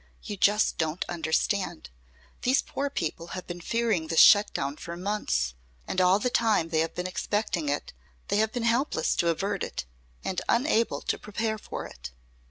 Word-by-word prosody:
You 205 - -5
just 205 +2 +3
don't 160 +1 -1
understand. 165 - -1 0.5
These 260 +2 +3
poor 280 +1 -3
people 165 - -3
have 185 - -6
been 175 0 -7
fearing 220 -5 0
this 165 0 +2
shut 205 0 +8
down 140 +2 -3
for 170 0 -7
months. 185 - -1 0.3
And 185 - 0
all 185 +1 +5
the 245 +4 -1
time 220 -9 +2
they 160 -1 +1
have 165 0 -1
been 180 - -3
expecting 185 -4 -1
it 145 - -2 0.4
they - - +2
have 220 +1 +2
been 245 -1 -3
helpless 235 +5 +1
to 170 - +2
avert 195 +4 -1
it - - -4 0.4
and 185 - -2
unable 235 -2 +2
to - - -2
prepare 220 +1 -2
for - - -6
it." 60 0 -9
195 Hz, 180 wpm, -27 LUFS, 165-220 Hz, 0.5 s, shut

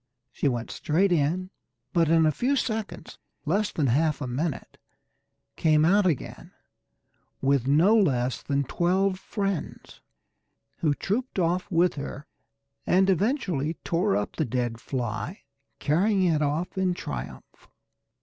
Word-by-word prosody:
She - - -1
went 120 -3 -2
straight 180 +6 +1
in, 175 +4 0 0.4
but 165 -2 +3
in 165 -1 +4
a 155 - +4
few 255 - 0
seconds 220 - -4 0.3
less 200 +7 +1
than 150 - 0
half 150 +5 +2
a 145 - -3
minute 135 +5 -4 0.8
came 155 -1 +3
out 195 +3 +4
again 155 -7 -3 0.9
with 135 -2 +1
no 165 +10 +5
less 130 - +1
than 140 0 0
twelve 185 +6 0
friends, 195 -6 -4 0.8
who 150 -3 +1
trooped 240 - -3
off 180 0 0
with 175 0 +3
her, 145 +1 -7 0.6
and 190 +1 +4
eventually 185 - 0
tore 180 +4 +1
up 105 - -4
the 160 - +1
dead 120 -2 -2
fly, 120 - -4 0.4
carrying 190 +6 +2
it 165 -4 +2
off 155 +6 -1
in 185 -2 +1
triumph. 65 - -8
165 Hz, 130 wpm, -26 LUFS, 140-190 Hz, 0.9 s, no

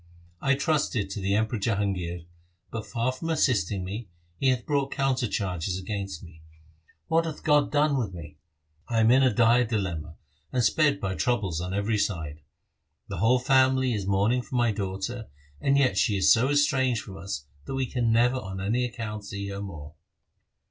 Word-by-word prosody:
I 140 0 +3
trusted 140 - 0
to 100 - -4
the 100 +1 0
Emperor 110 +1 0
Jahangir, 95 -5 -2 0.5
but 110 -2 -5
far 115 +5 0
from 165 +6 -6
assisting 105 - +1
me, 100 +3 -6 0.3
he 135 - +1
hath 125 -2 0
brought 140 -2 0
counter 135 -3 0
charges 90 -3 -2
against 95 -3 -5
me. 85 -2 -14 0.7
What 165 0 +2
hath 160 -2 -6
God 150 -1 +3
done 150 -1 +3
with 115 -7 -1
me? 80 -4 -10 0.5
I 115 -1 0
am 110 +1 +5
in 130 +2 +6
a 130 -2 +4
dire 120 +2 +4
dilemma, 90 -9 -3 0.4
and 125 -2 +1
sped 145 +4 +3
by 95 -7 -2
troubles 95 -7 0
on 90 +1 -3
every 105 +1 0
side. 80 -7 -2 0.7
The 95 - -4
whole 115 +7 +4
family 130 -1 +3
is 100 -3 -3
mourning 100 +6 +2
for 125 - -8
my 120 -2 +3
daughter, 100 +3 -4 0.3
and 140 0 +3
yet 135 -2 +3
she 105 -5 +2
is 95 - +6
so 120 +3 +2
estranged 130 -4 +2
from 95 -2 -10
us, 80 -5 -5 0.2
that 135 - -4
we 135 -1 0
can 120 -2 0
never 120 +3 +3
on 95 -5 -6
any 110 +6 0
account 110 -3 -5
see 100 0 -5
her 100 0 -5
more.' 80 -7 -8
110 Hz, 185 wpm, -27 LUFS, 95-130 Hz, 0.7 s, in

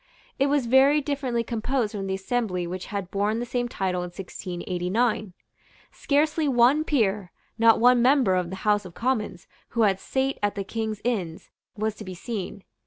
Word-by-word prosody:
It 275 - +3
was 280 -2 +1
very 265 +5 +5
differently 270 -5 -1
composed 230 0 -1
from 195 -2 -4
the 190 - -1
assembly 195 -3 -2
which 180 +1 -5
had 200 -3 -5
borne 205 +2 0
the 240 - -2
same 245 0 -2
title 185 -4 -1
in - - -3
1689. 185 +3 -2 0.6
Scarcely 305 +1 +1
one 260 +4 +4
peer, 210 - 0 0.3
not 230 0 +6
one 245 +1 +5
member 255 -5 +4
of 180 -2 0
the 190 - -5
House 210 0 +3
of 185 -2 -11
Commons, 225 -8 -2 0.2
who 235 -2 +1
had 195 -2 +2
sate 270 +4 -1
at 205 0 0
the 200 - -2
King's 220 0 -4
Inns, 190 -9 -3 0.3
was 215 +1 -1
to - - -8
be 185 -2 -7
seen. 200 -1 -5
220 Hz, 175 wpm, -25 LUFS, 190-250 Hz, 0.6 s, not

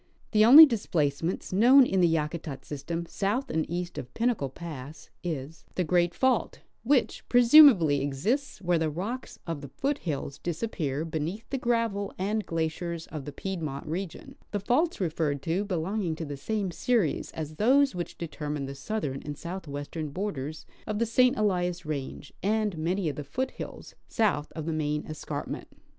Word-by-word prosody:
The 215 -1 +5
only 280 +8 +12
displacements 170 - -1
known 250 +7 +7
in 190 -5 +1
the 175 - +6
Yakutat 155 -2 -2
system 165 +4 -4
south 205 +9 -1
and 160 -1 -1
east 175 +1 -3
of 125 - -8
Pinnacle 230 - 0
pass 150 -1 -9
is 160 -2 -5
the 180 - +1
great 175 0 +2
fault 260 -3 +1 0.2
which 255 +2 +1
presumably 240 - +7
exists 200 - -1
where 175 -1 +2
the 160 -1 +1
rocks 205 - -5
of 165 -4 -4
the 140 - -7
foothills 155 - -3
disappear 165 -5 -2
beneath 165 +7 -4
the 270 - -1
gravel 230 -5 0
and 210 +3 -1
glaciers 165 +1 -2
of 150 -4 -6
the 145 - -5
Pied 190 +4 -5
mont 140 -3 -4
region, 170 +2 -5 0.2
the 205 - -2
faults 260 - +1
referred 155 -6 -1
to 180 +5 0
belonging 180 -1 -1
to 160 - -5
the 145 -1 -5
same 195 +6 -2
series 215 - 0
as 155 -1 -6
those 270 +5 +4
which 175 -1 -5
determine 150 -3 -4
the 135 - -6
southern 140 -2 -3
and 145 -1 -6
southwestern 155 -3 -5
borders 155 -4 -4 0.2
of 215 - -2
the 235 - +2
St. 250 +3 +3
Elias 180 -4 0
range 140 -2 -5
and 210 0 +1
many 175 +4 -1
£)f - - -15
the 150 - -4
foothills 255 - -5
south 205 -10 0
of 160 -2 -5
the 165 - -1
main 150 -1 -1
escarpment. 150 -1 -5
170 Hz, 165 wpm, -28 LUFS, 150-215 Hz, 0.2 s, only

